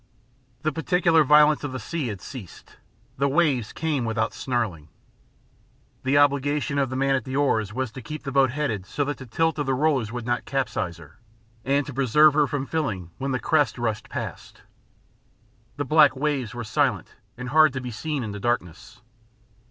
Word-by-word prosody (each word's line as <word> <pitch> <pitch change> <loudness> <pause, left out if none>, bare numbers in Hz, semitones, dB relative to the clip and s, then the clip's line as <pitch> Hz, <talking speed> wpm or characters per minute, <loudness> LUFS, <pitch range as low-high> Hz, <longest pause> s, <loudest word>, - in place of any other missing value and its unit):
The 155 - +1
particular 165 +1 +3
violence 150 +1 +5
of 145 -3 -4
the 130 - -4
sea 150 +4 -3
had 100 -5 -5
ceased. 120 - -11 0.4
The 140 - +3
waves 140 -6 +1
came 150 -5 -1
without 110 -1 -1
snarling. 110 - -3 1.1
The 135 +2 +2
obligation 145 0 +2
of 135 -2 +1
the 130 - -4
man 135 +1 +1
at 135 -3 0
the 130 +3 -5
oars 110 -8 +1
was 130 0 -3
to 130 - -9
keep 150 +6 -7
the 135 - -4
boat 135 -1 +4
headed 120 -8 -3
so 145 - -1
that 145 +1 -3
the 130 - -10
tilt 160 +6 0
of 145 - -1
the 135 - +1
rollers 135 -6 +1
would 120 -1 -5
not 120 0 -1
capsize 130 -10 -2
her, 85 -3 -16 0.4
and 140 +2 +1
to 140 - -7
preserve 140 +4 +5
her 150 -1 +3
from 140 0 -3
filling 105 - -3
when 135 +1 -2
the 130 - +1
crests - - +1
rushed 110 -3 -3
past. - - -7 1.1
The 145 - -2
black 150 -3 +5
waves 135 -4 -2
were 120 - -4
silent 105 - 0 0.2
and 125 0 -6
hard 155 +2 +5
to 130 - -3
be 125 -1 -6
seen 145 +4 -3
in 110 - -4
the 105 - -6
darkness. 100 -7 -3
135 Hz, 190 wpm, -24 LUFS, 120-145 Hz, 1.1 s, violence